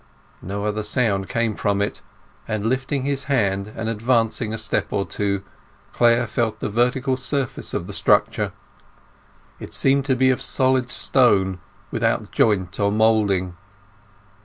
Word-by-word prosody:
No 100 +3 -4
other 105 0 -1
sound 105 -3 0
came 115 -2 0
from 100 0 -1
it, 100 - -2 0.5
and 110 -1 -2
lifting 130 +3 -1
his 140 0 -2
hand 100 -6 0
and 110 0 -4
advancing 115 0 0
a 110 - -2
step - - -1
or 100 -1 0
two, 100 -1 -2 0.5
Clare 120 0 +3
felt 110 -1 -2
the - - -3
vertical 125 +4 +1
surface 135 0 -2
of - - -2
the - - -7
structure. - - +2 1.1
It - - -7
seemed 135 0 +3
to 135 -2 +2
be 130 +1 +3
of 130 - -2
solid 130 -1 +1
stone, 95 -9 +2 0.3
without - - -1
joint 95 -4 +1
or 100 -1 +2
moulding. 105 -5 +2
110 Hz, 145 wpm, -22 LUFS, 100-130 Hz, 1.1 s, Clare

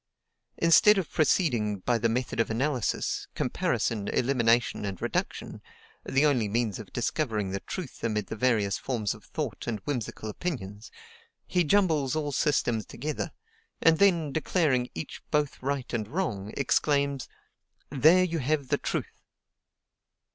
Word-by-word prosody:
Instead 180 +5 +6
of 185 -5 -2
proceeding 125 - +2
by 115 +5 0
the 115 - +2
method 125 +1 -2
of 115 - +2
analysis, 125 +1 -1
comparison, 105 -3 -1
elimination, 120 -4 +2
and 95 -3 -4
reduction - - -3 0.4
(the 135 +3 +2
only 125 -7 +2
means 110 -1 -1
of 110 - -10
discovering 110 -6 -1
the 100 - -2
truth - - -7
amid 105 -3 0
the - - -6
various 110 -4 +1
forms 115 -6 -1
of - - -14
thought - - -5
and 115 -2 -1
whimsical 120 -5 -4
opinions), 105 - -5 0.6
he 180 - +1
jumbles 160 -7 +2
all 150 -2 -1
systems 130 -6 +1
together, 150 +5 -4 0.5
and 165 0 +4
then, 170 -7 +3
declaring 145 -5 +1
each 80 - -6
both 150 -2 0
right 135 -1 -3
and 110 -3 -1
wrong, 110 - -3
exclaims: 140 0 +1 0.6
"There 155 +7 +5
you 170 -2 -1
have 140 0 -1
the - - +1
truth." - - -4
130 Hz, 140 wpm, -28 LUFS, 110-150 Hz, 0.6 s, Instead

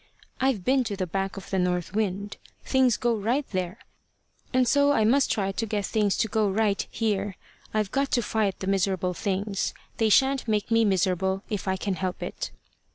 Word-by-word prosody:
I've 255 -8 +1
been 260 0 +3
to 205 - -3
the 190 -1 -2
back 195 +3 -3
of 195 - -9
the 190 - +1
north 180 0 0
wind. 200 -1 -2 0.3
Things 260 -4 +3
go 240 -1 +1
right 235 +7 0
there, 185 -2 -2 0.7
and 255 -1 +3
so 285 +3 +4
I 220 -5 +3
must 270 +5 +3
try 195 -2 0
to 225 +4 -2
get 205 -1 -1
things 210 -3 +1
to 225 - +1
go 215 -1 +1
right 205 0 +1
here. 205 -3 -1 0.4
I've 215 -3 0
got 275 0 0
to 240 - +3
fight 210 -2 -1
the - - -2
miserable 190 -1 +1
things. 195 +2 -2 0.2
They 225 -1 +2
shan't 265 +3 +3
make 215 +1 0
me 225 0 +4
miserable 190 0 +1
if 205 -2 -3
I 190 0 +1
can 195 +1 -2
help 185 0 -3
it." - - -4
205 Hz, 195 wpm, -26 LUFS, 190-225 Hz, 0.7 s, so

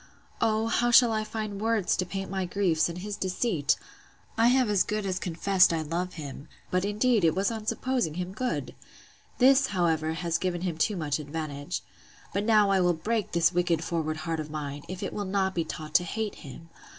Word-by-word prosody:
O, 220 0 +2
how 240 +1 +1
shall 240 -1 +7
I 215 -1 0
find 215 -2 -5
words 225 -4 +1
to 185 - -1
paint 195 0 -5
my 190 -1 -1
griefs, 175 -3 +1
and 170 - -6
his 205 +3 -5
deceit! 185 -5 0 0.6
I 230 +1 +4
have 255 0 +4
as 205 -3 +2
good 210 -1 -1
as 185 -1 -1
confessed 185 +2 +3
I 160 -1 -1
love 175 +4 -3
him; 145 -2 -8 0.2
but, 185 0 +1
indeed, 210 +1 +2
it 160 -2 +3
was 195 +4 +1
on 220 -1 -6
supposing 250 -13 -1
him 180 +1 -4
good.—This, 255 +3 0
however, 165 -5 0
has 165 0 -1
given 180 -2 -2
him 175 -3 -3
too 205 +6 +2
much 150 -3 -1
advantage. 150 +1 -5 0.5
But 200 +2 -1
now 210 -3 +4
I 190 -1 +3
will 175 -1 +3
break 215 +5 -2
this 170 +1 +3
wicked 175 -2 +1
forward 160 -2 -2
heart 160 0 -3
of 155 0 -5
mine, 145 -2 -5
if 185 +1 -6
it - - -3
will 205 - -3
not 190 0 0
be 170 - 0
taught 155 -1 -7
to 175 - +5
hate 215 +4 -3
him! 165 +3 -11
185 Hz, 200 wpm, -28 LUFS, 165-210 Hz, 0.6 s, shall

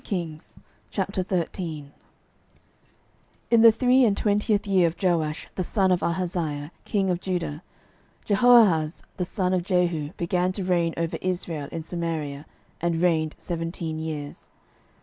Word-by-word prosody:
12:013:001 175 -2 -4 1.6
In 230 -1 +6
the 230 0 +9
three 255 +3 +4
and 205 -4 +3
twentieth 210 0 +1
year 190 -3 +4
of 165 - -3
Joash 165 -5 0
the 185 - -2
son 190 0 +1
of 180 - +2
Ahaziah 170 -4 -2
king 195 -3 +1
of 175 0 -2
Judah 175 -5 -3 0.6
Jehoahaz 205 -8 +4
the 180 - -1
son 185 0 -1
of 185 - +2
Jehu 175 -5 0
began 180 +1 0
to 195 - -3
reign 170 -2 +1
over 165 0 -1
Israel 170 -5 -3
in 165 - -5
Samaria, 155 -4 -4 0.3
and 170 -1 0
reigned 160 -3 +1
seventeen 165 -1 -4
years. 150 -2 -6
175 Hz, 130 wpm, -25 LUFS, 160-190 Hz, 1.6 s, the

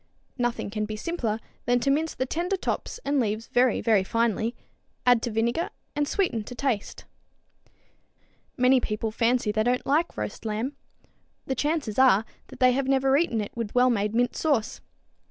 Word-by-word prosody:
Nothing 240 -4 -1
can 215 0 -2
be 215 0 -5
simpler 225 -4 -2 0.3
than 245 +1 +3
to 275 - +2
mince 315 +3 0
the 260 - -1
tender 350 +8 -1
tops 425 - -3
and 285 0 +1
leaves 220 -1 -1
very, 245 -1 +2
very 215 -5 +3
finely, 230 +2 0 0.5
add 245 -2 +5
to 240 - -2
vinegar 235 +8 0 0.3
and 295 0 0
sweeten 325 - 0
to 245 - -8
taste. 240 -5 -2 1.5
Many 255 0 +5
people 215 -1 -3
fancy 230 -1 +1
they 215 +1 0
don't 245 +3 +1
like 315 +5 +1
roast 105 - -5
lamb. 225 +6 -3 0.7
The 265 - -1
chances 290 -6 -1
are 240 -5 +5 0.2
that - - -13
they 255 -1 +6
have 265 +1 0
never 270 0 +3
eaten 280 -8 +1
it 205 - -5
with 230 -2 -4
wellmade 230 -4 +2
mint 245 +1 +1
sauce. 280 -9 0
245 Hz, 170 wpm, -26 LUFS, 220-270 Hz, 1.5 s, they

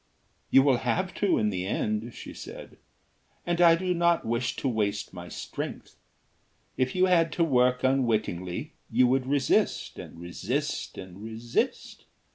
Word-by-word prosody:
"You 135 - +6
will 135 -3 +4
have 185 +8 -1
to 200 -3 +3
in 105 -1 +1
the 95 -1 -3
end," 110 +3 -2
she - - -9
said, - - -10 0.7
"and 175 0 0
I 170 -1 +8
do 180 +1 -1
not 170 -1 +2
wish 115 +2 -1
to - - -2
waste 105 -4 -1
my 90 -1 -8
strength. - - -6 0.8
If 130 0 0
you 185 0 +4
had 165 -3 +3
to 170 - +2
work 125 -4 +3
unwittingly 115 - 0 0.2
you 125 +2 +4
would 130 +1 +1
resist 140 -1 +1
and 85 - -10
resist 120 - -3
and 95 +1 -9
resist. 115 +1 -3
125 Hz, 150 wpm, -27 LUFS, 105-155 Hz, 0.8 s, I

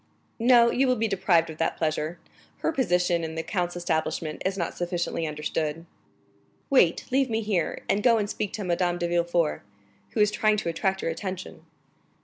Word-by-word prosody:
"No, 235 0 +6
you 270 +1 +2
will 255 - +3
be 225 -1 0
deprived 180 -5 +2
of 155 - -12
that 165 - 0
pleasure; 155 +1 -1 0.4
her - - +1
position 180 - +1
in 160 0 -4
the 160 - -2
count's 175 -2 -2
establishment 160 -2 -2
is 190 +1 -1
not 170 - -2
sufficiently 175 -2 -2
understood." 155 +1 -3 0.9
"Wait; 180 -11 +4
leave 265 0 +2
me 225 0 0
here, 205 -6 -1
and 200 - +1
go 235 -1 +5
and 210 -2 0
speak 205 -1 -3
to 210 - -4
Madame 175 -1 0
de 175 0 -1
Villefort, 170 -2 +1 0.5
who - - -2
is 210 0 +4
trying 215 0 +2
to 200 - -2
attract 190 +3 -1
your 165 - 0
attention." 185 +2 -6
175 Hz, 180 wpm, -26 LUFS, 165-210 Hz, 0.9 s, No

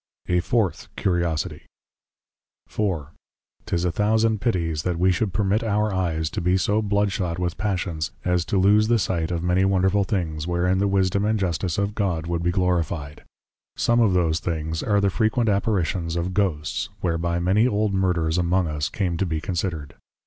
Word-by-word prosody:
A 90 0 +2
FOURTH 105 +2 0
CURIOSITIE. 85 -5 -1 1.1
IV. 95 -9 -2 0.6
'Tis 85 0 0
a 90 - +1
thousand 110 +2 +1
pitties, 85 -10 0
that 90 +1 -2
we 95 +2 +3
should 95 +3 0
permit 105 +2 +1
our 105 -1 0
Eyes, 85 -4 -1
to - - -3
be 90 +2 +2
so 105 +4 +1
Blood 100 -1 +1
shot 90 -3 -2
with 90 -1 -2
passions, 90 -6 -2 0.2
as 90 -1 +2
to 100 - -1
loose 105 +3 +4
the 120 +1 +3
sight 85 -6 -1
of 85 -1 -2
many 90 +1 +2
wonderful 95 +1 +2
things, 85 -6 -2
wherein 90 +2 +1
the 100 - +2
Wisdom 100 0 +1
and 110 +1 +1
Justice 90 -2 -1
of 100 0 0
God, 90 -7 -1
would 85 0 -2
be 85 - +1
Glorify'd. 85 -5 -1 0.5
Some 120 0 +2
of 110 -5 +4
those 85 -3 +2
things, 80 -1 -3
are 105 -1 +2
the 100 -1 +2
frequent 110 +3 +1
\Apparitions\ 95 -5 0
of 85 +2 -2
Ghosts, 90 -4 -1
whereby 85 0 0
many 95 +7 +3
Old 105 -3 0
\Murders\ 90 -3 +1
among 90 +1 +2
us, 75 -2 -2
come 90 -5 -2
to 95 - 0
be 80 -2 -1
considered. 85 -5 -3
90 Hz, 180 wpm, -23 LUFS, 85-100 Hz, 1.1 s, loose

